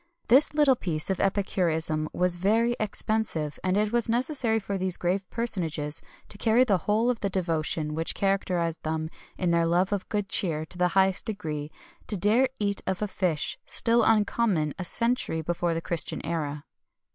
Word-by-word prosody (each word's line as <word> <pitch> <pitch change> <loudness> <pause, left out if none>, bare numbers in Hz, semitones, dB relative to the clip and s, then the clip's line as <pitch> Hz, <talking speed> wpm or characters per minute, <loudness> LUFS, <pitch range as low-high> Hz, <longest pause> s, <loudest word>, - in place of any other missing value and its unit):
[XXI - - -39
219] 240 - +7
This 290 +3 +5
little 290 -3 +5
piece 165 -8 -1
of 190 - -2
epicurism 165 -6 0
was 180 -1 +3
very 225 +6 +2
expensive, 215 -7 -1
and 185 +1 +1
it 210 0 +1
was 235 -1 0
necessary 240 -1 +1
for 200 -1 -5
these 185 -2 +1
grave 185 +2 -2
personages 165 -10 -2 0.3
to 205 - -5
carry 230 +3 +4
the 200 -7 +1
whole 225 +4 +3
of 235 - -5
the 200 - -2
devotion 160 -4 -1
which 165 +1 -1
characterized 180 -4 -1
them 160 0 -3 0.3
in 180 -2 0
their 170 0 +2
love 180 +4 +1
of 200 -2 -4
good 205 -2 -2
cheer 160 -5 +1
to 175 - -2
the 180 - +3
highest 190 -1 +3
degree, 155 -9 -4 0.4
to 210 - -1
dare 225 +8 +4
eat 200 -1 +1
of 190 +2 -1
a - - -1
dish 180 -6 -1
still 235 0 +3
uncommon 210 -7 +1
a - - -2
century 230 -5 -1
before 170 +1 -1
the 165 - -2
Christian 170 -2 -2
era. 150 -3 -3
190 Hz, 180 wpm, -26 LUFS, 165-220 Hz, 0.4 s, 219